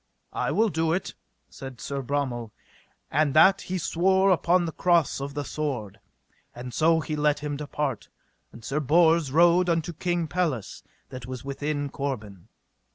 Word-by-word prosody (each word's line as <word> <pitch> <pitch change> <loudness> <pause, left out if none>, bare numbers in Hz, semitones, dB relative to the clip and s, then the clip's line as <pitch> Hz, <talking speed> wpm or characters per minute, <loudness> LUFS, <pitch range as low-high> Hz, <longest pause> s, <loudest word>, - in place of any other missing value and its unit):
I - - -1
will 220 +1 +2
do 160 -2 0
it, 185 - -3 0.3
said 135 -3 -10
Sir 140 +4 -4
Bromel, 130 -4 -2 0.6
and 150 0 +1
that 195 +5 +6
he 185 - -4
sware 190 +3 +2
upon 175 0 +2
the 165 - -3
cross 170 -5 +1
of 140 +1 -5
the 145 -1 -3
sword. 125 -11 -4 0.6
And 125 0 -8
so 160 +3 +3
he 155 - -4
let 150 -1 +1
him 145 -1 -3
depart, 140 -6 -4 0.4
and 115 -1 -13
Sir 145 - -1
Bors 160 0 +3
rode 175 +3 +4
unto 165 0 0
King 175 +1 -1
Pelles, 155 - -2 0.3
that 125 -1 -8
was 130 +1 -7
within 145 +1 -3
Corbin. 110 -10 -5
150 Hz, 160 wpm, -26 LUFS, 135-170 Hz, 0.6 s, that